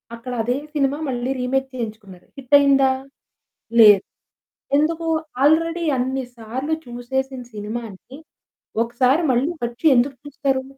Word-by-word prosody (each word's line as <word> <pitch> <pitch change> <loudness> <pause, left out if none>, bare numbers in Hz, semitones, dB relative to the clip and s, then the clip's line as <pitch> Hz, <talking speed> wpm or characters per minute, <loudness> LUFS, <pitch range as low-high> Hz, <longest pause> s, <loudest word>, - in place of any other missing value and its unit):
అక్కడ 250 +2 -7
అదే 245 +3 0 0.2
సినిమా 280 0 +1
మళ్ళీ 250 +1 -2
రీమేక్ 265 +2 -1
చేయించుకున్నారు. 215 -6 -7
హిటయిందా? 275 0 +4 0.9
లేదు. 205 -3 +8 0.7
ఎందుకు? 325 +2 0 0.4
ఆల్రెడీ 330 +3 +3
అన్ని 260 +1 -1
సార్లు 255 +7 -3
చూసేసిన 260 +2 -4
సినిమాని 220 +4 -7 0.6
ఒకసారి 250 +6 +2
మళ్ళీ 255 +6 +1 0.2
వచ్చి 240 +7 -5
ఎందుకు 260 +3 +1
చూస్తారు? 275 -2 -1
260 Hz, 105 wpm, -21 LUFS, 240-280 Hz, 0.9 s, లేదు